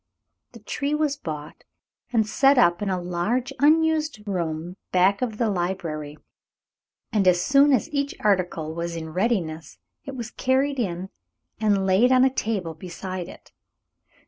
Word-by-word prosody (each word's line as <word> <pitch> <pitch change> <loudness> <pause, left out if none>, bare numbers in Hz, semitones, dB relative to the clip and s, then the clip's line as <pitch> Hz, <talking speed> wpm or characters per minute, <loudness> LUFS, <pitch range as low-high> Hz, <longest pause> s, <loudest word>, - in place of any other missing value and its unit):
The - - -11
tree 290 +1 -2
was 300 -2 0
bought 155 - -7 0.5
and 225 -3 +2
set 270 +5 +4
up 175 -7 +4
in 205 - -1
a 185 -1 0
large 205 +10 -2
unused 310 -5 +2
room 170 -1 -3
back 190 +3 +3
of 230 -4 -2
the 230 - +1
library, 175 -6 -3 1.0
and 200 -3 +2
as 180 -1 +5
soon 275 +9 +4
as 255 -6 +2
each 280 0 -1
article 180 -6 0
was 170 0 -4
in 160 -1 -5
readiness 175 -6 -1 0.3
it 275 -2 -6
was 235 -2 -6
carried 270 +1 0
in 185 -3 -3 0.5
and 205 -3 +2
laid 195 +7 +4
on 255 0 +6
a 265 - +2
table 200 -10 -2
beside 180 +2 -6
it. - - -14
200 Hz, 150 wpm, -24 LUFS, 175-260 Hz, 1.0 s, on